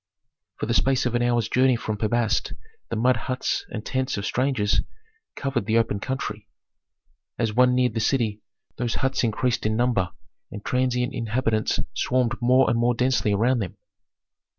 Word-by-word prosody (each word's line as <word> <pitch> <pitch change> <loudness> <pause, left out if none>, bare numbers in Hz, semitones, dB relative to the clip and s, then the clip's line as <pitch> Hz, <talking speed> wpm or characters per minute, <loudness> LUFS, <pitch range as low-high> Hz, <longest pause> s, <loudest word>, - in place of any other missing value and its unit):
For - - -3
the 115 - -1
space 130 +1 +2
of 125 - 0
an 120 - +1
hour's 120 -2 +1
journey 130 +2 +3
from 110 -2 -3
Pi 105 +1 -1
Bast 110 -1 0 0.4
the - - -2
mud 125 +3 +3
huts 125 +4 -2
and 110 -1 -6
tents 130 -3 -1
of 100 - -3
strangers 125 -5 +1 0.5
covered 135 -4 -2
the 110 +1 +3
open 110 -3 +1
country. 130 +5 -4 0.9
As 115 -3 0
one 125 +2 +4
neared 125 -2 +2
the 115 - -1
city, 110 -3 0 0.4
those 120 -2 -1
huts 135 0 0
increased 115 +1 0
in 110 0 0
number 115 -7 +1 0.4
and 105 0 -9
transient 125 0 0
inhabitants 115 -1 0
swarmed 125 -2 +1
more 130 +2 +4
and 115 - +1
more 120 +1 +2
densely 125 -3 +1
around 120 +5 +2
them. 95 -5 -5
120 Hz, 170 wpm, -24 LUFS, 110-125 Hz, 0.9 s, one